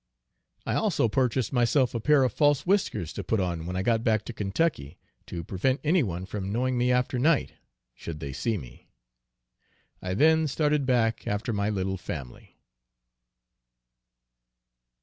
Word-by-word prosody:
I - - -1
also - - +1
purchased 125 +1 0
myself 125 +1 +2
a 115 - -1
pair 145 +4 +4
of 125 -4 0
false 145 -2 +2
whiskers 185 - 0
to - - -5
put 110 - 0
on 85 -3 -2
when 90 - -4
I 95 - -1
got 115 +1 +1
back 110 -2 +1
to 120 - -6
Kentucky, 100 - -1 0.3
to 85 -1 -5
prevent 115 - 0
any 165 +4 +3
one 90 -6 -3
from 95 0 -5
knowing 125 +3 0
me 125 +1 +2
after 125 0 +1
night, 150 +3 +2 0.4
should 80 +3 -8
they 70 -3 -6
see 110 - -1
me. 65 -8 -12 1.1
I 95 0 -3
then 160 +5 +4
started 150 -1 0
back 115 -3 +1
after 105 +3 -2
my 100 0 0
little 95 -2 -2
family. 70 -8 -8
115 Hz, 155 wpm, -27 LUFS, 95-135 Hz, 1.1 s, pair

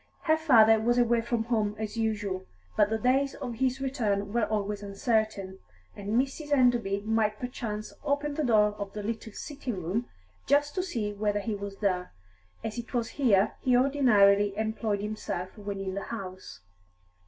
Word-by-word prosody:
Her 315 -1 +4
father 225 -9 +6
was 240 +2 +2
away 235 -1 +3
from 235 -1 -1
home, 215 -3 0
as 215 0 -4
usual, 210 -4 -2 0.3
but 205 - +4
the 220 - 0
days 265 +4 +2
of 240 - -5
his 260 +1 0
return 215 -7 -1
were 235 -2 +2
always 205 -1 -2
uncertain, 200 -2 -1 0.4
and 205 +4 0
Mrs. 280 +3 -3
Enderby 240 -7 +3
might 215 0 +1
perchance 215 -4 -5
open 290 0 0
the 305 +1 -1
door 215 -5 +4
of 200 -1 -5
the 210 - -5
little 225 +1 -4
sitting 265 -8 -5
room 210 +9 -1 0.4
just 290 +1 +3
to 370 - 0
see 230 - -3
whether 205 0 0
he 215 +2 -3
was 200 -1 -6
there, 180 - 0 0.5
as 225 +2 -4
it 235 +2 -7
was 235 -1 0
here 215 -7 +3
he 250 -1 +3
ordinarily 205 -7 +4
employed 220 -1 -1
himself 205 -3 -4
when 205 -2 -5
in 190 -1 -3
the 200 - -4
house. 185 - -7
220 Hz, 170 wpm, -28 LUFS, 205-245 Hz, 0.5 s, father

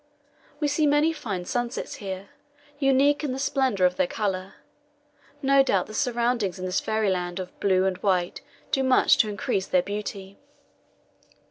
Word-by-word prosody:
We 300 - +1
see 295 +1 +2
many 295 +3 +3
fine 200 - -5
sunsets 240 +4 -3
here, 195 -1 -6 0.5
unique 280 +2 +3
in 275 -4 -1
the - - -4
splendour 265 -8 +1
of 180 - +1
their 280 - +2
colour. 195 -8 -3 0.9
No 275 0 +5
doubt 195 -9 +1
the 215 - -11
surroundings 235 -6 0
in 185 - -5
this 185 0 0
fairyland 190 -5 -1
of 185 - -8
blue 190 -1 +2
and 190 -1 0
white 180 -3 0 0.3
do 270 - +2
much 260 -1 +4
to 215 - +3
increase 195 -1 -2
their 180 -1 +2
beauty. 200 -1 -6
210 Hz, 155 wpm, -25 LUFS, 190-270 Hz, 0.9 s, No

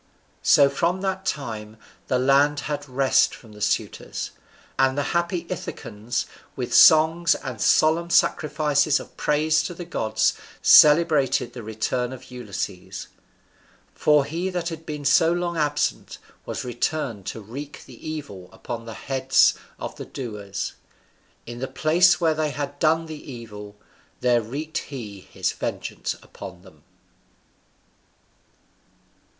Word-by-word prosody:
So 140 - +6
from 170 +7 0
that 190 -1 -2
time 110 -6 -4 0.3
the 130 - +1
land 140 +3 +3
had 145 -1 -4
rest 130 +1 +3
from 115 - -16
the 105 0 -13
suitors. 105 - -2 0.5
And 135 +1 +3
the 145 - +1
happy 170 0 0
Ithacans 120 - -4 0.3
with - - -4
songs 160 +2 +6
and 125 -5 -6
solemn 165 +2 +3
sacrifices 150 -2 +2
of - - -12
praise 155 +1 +2
to 170 +2 -5
the 175 - -7
gods 110 -9 +1 0.3
celebrated 150 -5 +5
the 125 - -7
return 110 +3 -2
of 130 0 -12
Ulysses; 120 -6 -6 0.8
for 150 -2 +3
he 170 +6 -3
that 175 -2 -2
had 160 -1 -8
been 150 -2 -5
so 150 +4 +5
long 175 0 -1
absent 145 -2 -1 0.3
was - - -4
returned 120 -4 -2
to - - -4
wreak 135 +8 -8
the 130 +4 -10
evil 120 -13 -7
upon 115 -2 -7
the 115 -1 -8
heads 135 -1 +3 0.2
of - - -7
the - - -7
doers; 105 -6 -5 0.7
in 120 0 -8
the 130 - -3
place 170 +3 +4
where 165 -3 +3
they 155 -1 -1
had 145 0 -5
done 160 +1 +2
the 155 -3 -9
evil, 105 -4 -9 0.5
there 120 -1 +3
wreaked 150 +9 -4
he 110 -8 -8
his - - -3
vengeance - - -4
upon 90 -1 -11
them. 80 -6 -18
140 Hz, 135 wpm, -24 LUFS, 120-155 Hz, 0.8 s, So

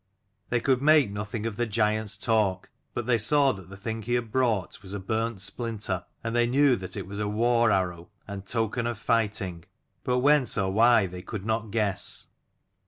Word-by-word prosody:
They 120 - +1
could 130 +1 +1
make 150 -6 +5
nothing 105 +2 -4
of 110 -3 -3
the 120 - 0
giant's 105 -2 0
talk, 105 -4 0 0.2
but 120 - -2
they 120 -1 +2
saw 140 +4 +4
that 95 -4 -10
the 100 - -10
thing 110 +2 -4
he 120 +3 -1
had 120 -2 -2
brought 115 -10 0
was 100 0 -7
a - - -3
burnt 110 +2 -2
splinter, 100 -2 -2 0.2
and 115 0 -3
they 120 0 +3
knew 135 +1 +4
that 95 +1 -6
it 100 - -4
was 100 +2 -6
a 105 - -1
war 115 +2 +2
arrow 90 -3 -1 0.2
and 100 -2 -6
token 115 +3 -1
of 115 -1 -6
righting: 100 -7 0 0.4
but 125 0 +1
whence 140 -1 +3
or 95 -2 0
why 115 0 +5
they 90 0 -7
could 100 +2 -7
not 110 0 -1
guess. 100 -2 0
110 Hz, 195 wpm, -27 LUFS, 100-120 Hz, 0.4 s, make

